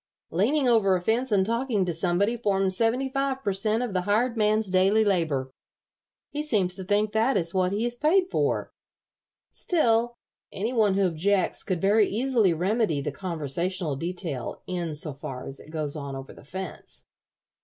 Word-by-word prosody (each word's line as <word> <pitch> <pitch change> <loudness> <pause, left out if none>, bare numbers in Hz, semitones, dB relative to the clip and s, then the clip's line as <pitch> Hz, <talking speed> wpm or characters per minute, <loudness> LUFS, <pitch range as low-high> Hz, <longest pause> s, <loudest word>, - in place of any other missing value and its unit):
Leaning 255 - +2
over 215 -6 +4
a - - 0
fence 235 +5 0
and 195 -2 +3
talking 230 -3 0
to 175 - -2
somebody 180 +7 +1
forms 195 -4 +1
seventy 235 +5 +1
five 270 0 -2
per 200 - 0
cent. 215 +4 0
of 235 -5 -4
the 185 - +1
hired 220 +6 +1
man's 215 -2 +1
daily 195 +4 +4
labor. 155 -9 0 0.8
He 295 - -2
seems 210 -12 0
to 190 - -5
think 205 +2 +1
that 225 +5 +2
is 165 -1 -1
what 185 -1 +1
he 210 +4 0
is 240 - -1
paid 315 +9 +3
for. - - 0 0.8
Still, 240 -8 +1 0.4
any 220 +6 -3
one 215 -5 +3
who 195 0 +3
objects 185 +3 +1
could 185 -3 -1
very 205 +2 +4
easily 230 -3 +2
remedy 185 0 0
the 145 +1 -3
conversational 170 0 -2
detail 165 -4 -5
in 170 -4 -3
so 150 0 -3
far 135 -2 -7
as 135 - -8
it - - -14
goes 155 -2 -3
on 140 -2 -5
over 135 0 -8
the - - -15
fence." 190 +7 -8
195 Hz, 175 wpm, -26 LUFS, 175-230 Hz, 0.8 s, over